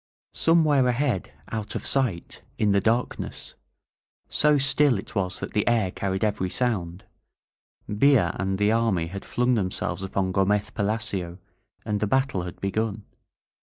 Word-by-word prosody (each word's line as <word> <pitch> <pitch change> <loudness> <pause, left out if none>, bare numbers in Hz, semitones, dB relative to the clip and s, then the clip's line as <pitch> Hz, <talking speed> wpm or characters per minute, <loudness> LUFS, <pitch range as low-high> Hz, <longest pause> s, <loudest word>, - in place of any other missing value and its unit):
Somewhere 155 -5 +3
ahead, 125 - 0 0.2
out 110 -2 -4
of - - -4
sight, 120 -11 -1 0.2
in 105 -2 +2
the 100 0 +3
dark 115 +4 0
ness - - -6 0.4
— - - -46
^so 150 -1 +3
still 140 -2 +4
it 95 - -8
was 95 -3 -1
that - - -6
the 105 - 0
air 110 -6 +2
carried 95 +1 -2
every 100 -3 0
sound 95 -7 -2 0.4
— - - -50
^Villa 105 -4 +3
and 95 0 -1
the 105 +1 +2
army 110 -7 +1
had 95 +4 -7
flung 125 +1 +1
themselves 100 -1 -2
upon 95 -1 -1
Go 95 +1 +2
mez 105 +1 0
Palacio, 100 -5 -2 0.5
and 105 -1 -1
the 105 - 0
battle 130 -4 +1
had 90 0 -7
begun. 105 +2 -2
105 Hz, 160 wpm, -25 LUFS, 95-120 Hz, 0.5 s, still